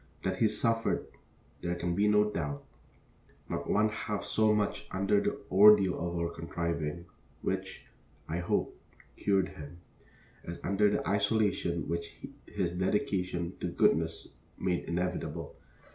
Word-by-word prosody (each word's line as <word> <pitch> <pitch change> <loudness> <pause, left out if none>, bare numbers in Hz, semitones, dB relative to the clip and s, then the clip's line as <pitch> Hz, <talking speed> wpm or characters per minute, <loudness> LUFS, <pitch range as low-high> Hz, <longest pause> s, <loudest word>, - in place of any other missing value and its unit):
That - - -1
he 110 - +5
suffered 115 +1 +1 0.6
there 85 0 -1
can 85 0 -2
be 100 +4 +2
no 105 0 +4
doubt 75 -6 -3 0.8
not - - -4
one 105 +1 +3
half 105 -1 -3
so 110 -1 +3
much 105 -1 0
under 100 +1 +2
the - - -1
ordeal 100 -1 +7
of 85 0 -3
our 85 0 0
contriving, 85 -1 -3 0.4
which, - - -3 0.4
I 85 +2 -2
hope, 85 - -1 0.3
cured 95 -2 +1
him, 75 +3 -10 0.7
as 85 +1 -6
under 100 +2 +3
the 105 - -1
isolation 100 -4 +1
which 85 0 -4 0.3
his 90 -4 -2
dedication 90 -2 0
to - - -2
goodness 80 +1 +1 0.3
made 90 -2 -1
inevitable. 90 +2 -3
90 Hz, 130 wpm, -31 LUFS, 85-105 Hz, 0.8 s, ordeal